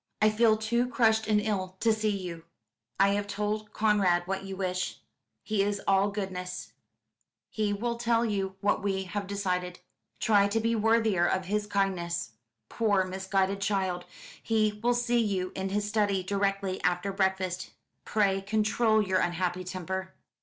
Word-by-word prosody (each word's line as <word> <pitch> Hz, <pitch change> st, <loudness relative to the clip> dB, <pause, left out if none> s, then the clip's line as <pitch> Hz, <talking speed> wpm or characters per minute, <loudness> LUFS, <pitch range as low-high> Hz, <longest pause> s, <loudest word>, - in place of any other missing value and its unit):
"I 215 Hz, 0 st, +4 dB
feel 220 Hz, 0 st, +4 dB
too 235 Hz, +3 st, 0 dB
crushed 220 Hz, -3 st, +2 dB
and 210 Hz, -1 st, +3 dB
ill 190 Hz, -3 st, -2 dB
to 225 Hz, -1 st, +3 dB
see 215 Hz, 0 st, 0 dB
you 180 Hz, -5 st, -4 dB, 0.5 s
I 195 Hz, 0 st, +6 dB
have 205 Hz, 0 st, 0 dB
told 210 Hz, +1 st, -3 dB
Conrad 200 Hz, -6 st, +2 dB
what 195 Hz, +1 st, -3 dB
you 195 Hz, -1 st, -6 dB
wish 185 Hz, -1 st, -2 dB, 0.5 s
he 215 Hz, -2 st, 0 dB
is 200 Hz, 0 st, 0 dB
all 195 Hz, +1 st, +4 dB
goodness 185 Hz, -3 st, -5 dB, 0.8 s
he 215 Hz, -2 st, 0 dB
will 235 Hz, +3 st, -2 dB
tell 235 Hz, 0 st, +2 dB
you 195 Hz, -3 st, -2 dB
what 205 Hz, 0 st, +1 dB
we 195 Hz, -1 st, -1 dB
have 195 Hz, +2 st, -4 dB
decided 180 Hz, -3 st, -2 dB, 0.4 s
try 205 Hz, -3 st, +4 dB
to 215 Hz, +3 st, 0 dB
be 230 Hz, +1 st, +1 dB
worthier 220 Hz, -5 st, +3 dB
of 185 Hz, 0 st, 0 dB
his 210 Hz, +2 st, -1 dB
kindness 175 Hz, -, -1 dB, 0.4 s
poor 205 Hz, -, +2 dB
misguided 190 Hz, +1 st, -1 dB
child 190 Hz, -3 st, -1 dB, 0.4 s
he 215 Hz, -2 st, +1 dB
will 240 Hz, +1 st, +2 dB
see 240 Hz, 0 st, +1 dB
you 195 Hz, -5 st, 0 dB
in 190 Hz, 0 st, -3 dB
his 205 Hz, +1 st, -1 dB
study, 205 Hz, -3 st, +1 dB
directly 195 Hz, 0 st, -1 dB
after 180 Hz, +2 st, 0 dB
breakfast 190 Hz, -1 st, -1 dB, 0.3 s
pray 195 Hz, -2 st, +1 dB
control 215 Hz, +2 st, +2 dB
your 190 Hz, -2 st, +1 dB
unhappy 180 Hz, +1 st, -1 dB
temper." 190 Hz, +1 st, -5 dB
200 Hz, 155 wpm, -29 LUFS, 190-215 Hz, 0.8 s, I